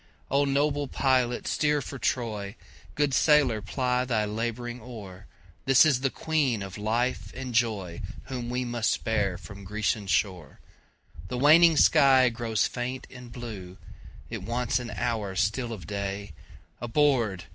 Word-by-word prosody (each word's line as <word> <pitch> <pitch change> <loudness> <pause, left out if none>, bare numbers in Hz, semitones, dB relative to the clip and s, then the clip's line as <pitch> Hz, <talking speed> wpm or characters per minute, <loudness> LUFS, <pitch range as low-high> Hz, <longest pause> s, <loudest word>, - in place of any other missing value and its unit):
O 140 +1 +3
noble 145 +1 +1
pilot 130 -3 +1
steer 150 -1 +1
for 140 0 -7
Troy, 110 -4 -2 0.4
Good 145 -2 +1
sailor 140 -7 +4
ply 125 +4 0
the 115 -4 0
labouring 120 +3 -4
oar, 105 -5 -10 0.4
This 135 +3 +6
is 140 -5 +2
the 135 - +1
Queen 135 -9 0
of 95 -1 -8
life 115 +4 -1
and 130 -1 -6
joyWhom 115 +2 -2
we 125 +1 -2
must 120 -2 -1
bear 100 -5 0
from 100 -1 -11
Grecian 105 +1 -2
shore! 95 -4 -1 0.7
The 125 - -4
waning 160 +4 +6
sky 135 -5 +6
grows 115 -2 -1
faint 125 +1 -4
and 125 -2 -11
blue, 105 -7 -8 0.5
It - - -4
wants 120 +1 -1
an 120 -1 -6
hour 110 -5 -2
still 110 +5 0
of 100 -8 -7
day, 100 +1 -4 0.5
Aboard! 120 - +1
120 Hz, 140 wpm, -27 LUFS, 105-130 Hz, 0.7 s, This